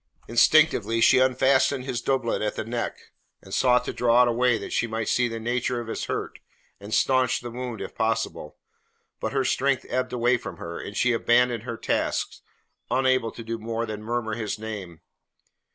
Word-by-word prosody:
Instinctively 115 -3 +4
she 130 +3 +6
unfastened 130 +1 +3
his 125 -3 -3
doublet 130 -4 0
at 105 0 -1
the - - -3
neck, 120 +1 -3 0.5
and 95 - -11
sought 125 -1 +3
to - - -3
draw 120 0 +4
it - - +2
away 120 0 +2
that - - -7
she 115 - +1
might 110 -1 -3
see 125 -1 +2
the 115 -1 -5
nature 120 +2 -1
of 120 - -5
his - - -3
hurt - - -4 0.4
and 100 +1 -10
staunch 130 +1 +2
the 120 -1 -7
wound 125 -1 -5
if - - -6
possible, 110 -8 -2 0.6
but 110 - -3
her 135 -1 0
strength 135 0 +1
ebbed 130 +1 -1
away 120 +1 +2
from 100 -6 -8
her, 85 +1 -6
and 105 - -7
she 125 -1 +3
abandoned 120 0 +2
her 120 -2 -5
task, - - -1 0.5
unable 130 -3 +2
to 115 - -9
do 115 0 -4
more 115 +1 -3
than 105 -1 -6
murmur 110 0 -2
his 110 -1 -3
name. 105 -6 -7
120 Hz, 185 wpm, -25 LUFS, 110-125 Hz, 0.6 s, she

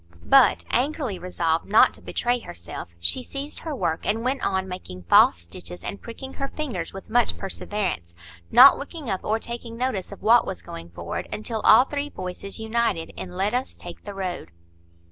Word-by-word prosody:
But, 270 -1 +5
angrily 260 - 0
resolved 165 -2 -1
not 215 - +6
to - - -11
betray 245 +1 -1
herself, 85 - -8
she 85 - +1
seized 275 +3 -6
her 315 -3 -5
work, 170 -8 -1
and 225 +2 0
went 265 +2 0
on 190 -1 0
making 135 - -8
false 85 +1 +6
stitches 85 +1 -9
and 200 - -5
pricking 265 +3 -8
her 275 - -3
fingers 245 - -4
with 195 +2 -10
much 240 0 +3
perseverance, 190 - -3 0.3
not 260 +3 +9
looking 285 - -5
up 190 - -2
or 215 +1 +1
taking 235 0 -6
notice 235 -7 -2
of 200 - -11
what 230 +2 +6
was 190 - -6
going 85 0 -9
forward, 85 0 -5
until 220 +1 -3
all 255 - +7
the - - -22
three 290 0 -2
voices 185 -2 -6
united 220 -6 -1
in 180 - -8
"Let 200 +3 +1
us 250 +1 -2
take 175 -1 -11
the 205 -1 -7
road." 180 - -4
210 Hz, 185 wpm, -24 LUFS, 175-245 Hz, 0.3 s, not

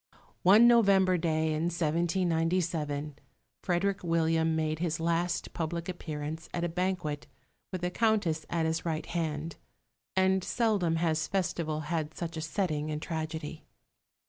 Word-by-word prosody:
One 210 +6 +7
November 195 -6 +5
day 160 -2 +1
in 155 +2 0
1797 165 -3 0 0.4
Frederick 190 +2 0
William 165 -1 +2
made 155 0 -1
his 170 -1 -1
last 170 +1 0
public 170 0 -3
appearance 160 -2 -5
at 170 - -1
a 175 - 0
banquet, 170 -5 -2 0.4
with 185 -2 -4
the 180 0 -1
Countess 205 -8 +1
at 165 -1 0
his 160 0 -1
right 160 -2 -2
hand; 160 -1 -3 0.6
and 190 0 +3
seldom 205 -9 +1
has 160 -1 +1
festival 165 -5 -1
had 155 0 -3
such 170 -1 -4
a 160 - -3
setting 155 -2 -1
in 150 0 -2
tragedy. 160 -1 -5
165 Hz, 135 wpm, -30 LUFS, 155-180 Hz, 0.6 s, One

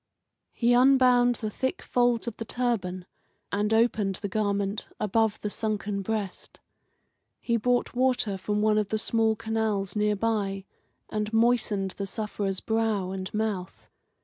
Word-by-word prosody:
He 240 0 +2
unbound 250 -1 +5
the 215 -2 -4
thick 260 +4 -2
folds 245 -1 +1
of 235 - -3
the - - -4
turban 210 -7 -2 0.5
and 210 +1 0
opened 220 -3 +2
the 205 - -2
garment 200 0 -1
above 215 +1 +1
the 210 - -2
sunken 210 -2 -2
breast. 205 -2 -4 0.8
He 235 - 0
brought 245 +2 +1
water 250 -5 +1
from 210 +2 -1
one 215 0 +3
of 210 -1 -2
the 215 - 0
small 220 0 +1
canals 220 -4 -1
near 210 0 +2
by, 200 -3 -1 0.5
and 210 0 -2
moistened 225 -4 +2
the 200 - -3
sufferer's 200 -2 -3
brow 220 -4 0
and 190 -1 -5
mouth. 210 -4 -3
215 Hz, 145 wpm, -27 LUFS, 200-230 Hz, 0.8 s, unbound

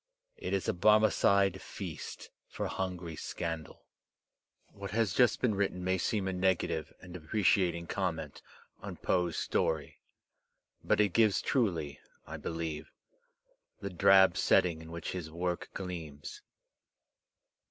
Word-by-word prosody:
It - - -4
is 95 - 0
a - - +2
Bar 105 +4 +5
mecide 100 -3 +3
feast 90 -6 -7 0.2
for - - -4
hungry 90 -3 -4
scandal. 80 +1 -5 0.8
What 100 0 -8
has 105 -1 +1
just 120 -3 +3
been 120 -4 +2
written 95 -2 -1
may 95 0 +1
seem 95 +2 0
a 95 - -1
negative 95 0 0
and 90 -1 -11
deprecating 90 0 +1
comment 80 -5 -3 0.4
on - - -7
Poe*s 90 -3 0
story. 80 -2 -1 0.8
But - - +2
it 100 -4 +2
gives 110 -3 +4
truly, 85 - 0 0.3
I - - -7
believe, 80 -2 -4 0.9
the 100 -1 -5
drab 95 +2 +6
setting 85 -3 +3
in 80 0 -11
which 85 -1 -5
his 90 -4 -5
work 85 +2 -3
gleams. 80 -6 -6
90 Hz, 130 wpm, -31 LUFS, 85-100 Hz, 0.9 s, drab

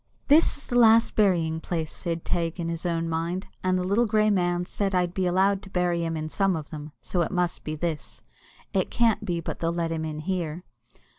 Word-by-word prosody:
"This 305 +2 +5
is 285 - -11
the 245 - +1
last 225 0 +5
burying 170 -6 +2
place," 160 -2 -3
said 165 -2 -4
Teig 170 0 -1
in 165 -1 -2
his 170 +1 -3
own 165 -1 -1
mind; 165 +4 -2 0.2
"and 185 0 +2
the 180 - -1
little 205 +6 +2
grey 215 0 +3
man 175 -2 +1
said 195 +1 -1
I'd 180 -1 +1
be 185 -1 0
allowed 190 +2 +2
to 195 - -12
bury 175 -2 0
him 165 -1 -2
in 155 0 -3
some 195 +3 +1
of 155 -3 -6
them, 150 -1 -7
so 180 - 0
it 170 - 0
must 180 -2 -1
be 155 - -3
this; 160 -1 -4 0.5
it - - +1
can't 230 -3 +2
be 175 -4 -2
but - - -5
they'll 165 0 0
let 170 -1 -2
him 160 -1 -2
in 155 -1 -4
here." 175 -1 -3
175 Hz, 225 wpm, -26 LUFS, 165-195 Hz, 0.5 s, This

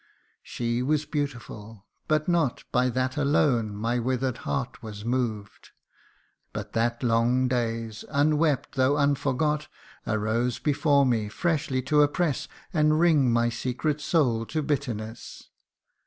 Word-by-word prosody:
She 120 0 -2
was 150 +3 +1
beautiful, 115 -8 -5 0.2
but 155 0 +1
not 170 -7 +1
By 125 +1 +2
that 130 +2 -1
alone 135 -7 +2
my 115 +4 -1
wither'd 130 0 -1
heart 130 -2 -4
was 105 -2 -8
moved; 115 -4 -3 0.8
But - - -6
that 120 +2 0
long 120 +2 +2
days, 115 -3 -2
unwept 150 -1 +1
though 130 +1 +2
unforgot, 145 +1 +1 0.4
Arose 110 +3 0
before 145 -1 +2
me, 115 -5 0
freshly 145 -1 -1
to 150 +3 +3
oppress, 145 0 +1 0.3
And 155 -1 +3
wring 155 -7 +4
my 120 0 +2
secret 130 +6 -2
soul 120 -9 +1
to 155 -1 -2
bitterness. 120 -6 -4
130 Hz, 125 wpm, -26 LUFS, 115-150 Hz, 0.8 s, wring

